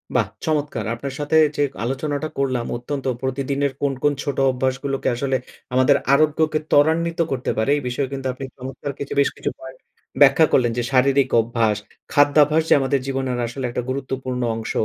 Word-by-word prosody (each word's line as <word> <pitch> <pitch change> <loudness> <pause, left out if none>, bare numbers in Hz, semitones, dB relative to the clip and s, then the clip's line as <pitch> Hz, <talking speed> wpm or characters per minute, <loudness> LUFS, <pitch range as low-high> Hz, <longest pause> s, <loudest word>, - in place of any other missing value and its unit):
বাহ! - - +3 0.2
চমৎকার! 145 -8 -1
আপনার 135 +3 -6
সাথে 145 +2 +1 0.2
যে - - -1 0.2
আলোচনাটা 145 +4 -2
করলাম, 130 -3 0
অত্যন্ত 135 +3 -5 0.2
প্রতিদিনের 140 +1 -1
কোন, 140 -1 +1
কোন 145 0 +3
ছোট 140 -2 -3
অভ্যাসগুলোকে 130 +1 -2
আসলে 135 +2 -1 0.4
আমাদের 130 0 +4 0.2
আরোগ্যকে 155 +1 +2
ত্বরান্বিত 165 +3 +3
করতে 130 -2 -1
পারে, 110 +4 0
এই - - -3
বিষয়ে 130 +3 -1
কিন্তু 135 -1 -3
আপনি 135 +1 -7
চমৎকার 135 +2 -6
কিছু, 140 - -4
বেশ 140 - +4
কিছু - - -2
পয়েন্ট 130 0 -11 0.4
ব্যাখ্যা 140 +3 +7
করলেন। 120 -3 +3
যে, 120 - 0
শারীরিক 135 +1 +3
অভ্যাস, 115 -2 0 0.4
খাদ্যাভ্যাস 150 +2 +4
যে - - +7
আমাদের 135 0 +1
জীবনের 130 -2 -2
আসলে 130 +2 -5
একটা 120 - -3
গুরুত্বপূর্ণ 130 -1 -3
অংশ। 110 0 -5
135 Hz, 165 wpm, -21 LUFS, 130-145 Hz, 0.4 s, ব্যাখ্যা